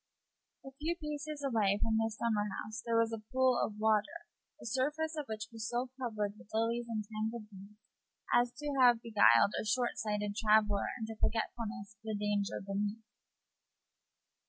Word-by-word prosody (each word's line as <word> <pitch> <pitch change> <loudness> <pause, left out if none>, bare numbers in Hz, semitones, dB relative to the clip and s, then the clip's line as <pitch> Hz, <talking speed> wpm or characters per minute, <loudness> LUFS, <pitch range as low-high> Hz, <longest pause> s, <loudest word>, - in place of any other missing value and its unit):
A 270 - -8
few 325 +3 0
paces 300 -2 -5
away 215 -7 +2
from 220 0 +1
this 225 -1 -1
summerhouse 215 0 -2
there 230 -1 +1
was 230 0 +2
a 225 - -3
pool 260 -1 +3
of 210 - -3
water, 220 +10 +1 0.3
the - - -11
surface 295 +7 -1
of 300 -3 -4
which 215 0 -4
was 225 -1 -4
so 245 +1 -2
covered 210 -4 -2
with - - -16
lilies 230 +2 0
and 215 -2 -2
tangled 220 +1 -3
weeds 200 +2 -13 0.6
as 240 0 +4
to 290 +2 -4
have 240 -2 +6
beguiled 200 - +5
a - - -5
short 240 +3 0
sighted 210 -1 -2
traveller 210 -2 +3
into 220 0 -4
forgetfulness 225 -2 -2
of - - -50
the 220 -1 -3
danger 205 -1 0
beneath. 205 +2 -2
225 Hz, 160 wpm, -33 LUFS, 210-245 Hz, 0.6 s, have